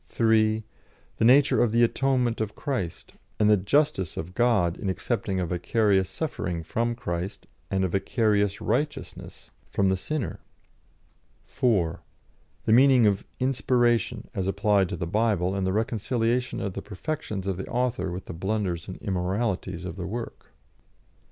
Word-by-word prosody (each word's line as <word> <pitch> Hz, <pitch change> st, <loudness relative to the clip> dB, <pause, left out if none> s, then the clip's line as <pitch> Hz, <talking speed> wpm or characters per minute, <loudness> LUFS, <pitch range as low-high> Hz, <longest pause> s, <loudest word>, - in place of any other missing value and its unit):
(3) 110 Hz, +2 st, +2 dB, 0.5 s
The -, -, +2 dB
nature 140 Hz, +4 st, +5 dB
of 120 Hz, -, +3 dB
the 115 Hz, +1 st, +4 dB
atonement 125 Hz, -1 st, +1 dB
of 110 Hz, -1 st, -3 dB
Christ, 100 Hz, -, -4 dB, 0.3 s
and 105 Hz, 0 st, +5 dB
the -, -, +7 dB
"justice" 100 Hz, -, +1 dB
of 85 Hz, +3 st, -5 dB
God 105 Hz, -7 st, +2 dB
in 100 Hz, -, -3 dB
accepting 95 Hz, 0 st, -2 dB
a 90 Hz, -, 0 dB
vicarious 95 Hz, +2 st, +1 dB
suffering 90 Hz, -, -3 dB
from 115 Hz, +8 st, -1 dB
Christ, 90 Hz, -4 st, -4 dB, 0.2 s
and 95 Hz, -1 st, 0 dB
a -, -, +2 dB
vicarious 105 Hz, +1 st, +1 dB
righteousness 145 Hz, +7 st, -3 dB, 0.2 s
from 100 Hz, -1 st, +1 dB
the 95 Hz, -, +2 dB
sinner. 140 Hz, +8 st, -3 dB, 1.1 s
(4) 95 Hz, -9 st, 0 dB, 0.6 s
The -, -, +2 dB
meaning 130 Hz, -1 st, +6 dB
of 100 Hz, -1 st, +1 dB
"inspiration" 120 Hz, -3 st, +1 dB
as 95 Hz, -1 st, -2 dB
applied 100 Hz, -1 st, +2 dB
to -, -, -3 dB
the 85 Hz, -, -3 dB
Bible, 100 Hz, -1 st, +1 dB
and 95 Hz, -1 st, -1 dB
the -, -, +1 dB
reconciliation 115 Hz, +3 st, 0 dB
of 100 Hz, -, -3 dB
the -, -, -5 dB
perfections 105 Hz, -, -5 dB
of 95 Hz, -2 st, -1 dB
the 95 Hz, -, -5 dB
author 125 Hz, -6 st, -1 dB
with 90 Hz, +2 st, -6 dB
the -, -, -7 dB
blunders 95 Hz, -1 st, -2 dB
and 95 Hz, -, -7 dB
immoralities 95 Hz, -1 st, -2 dB
of 90 Hz, 0 st, -6 dB
the 90 Hz, -1 st, -4 dB
work. 115 Hz, +4 st, -6 dB
105 Hz, 150 wpm, -26 LUFS, 95-120 Hz, 1.1 s, the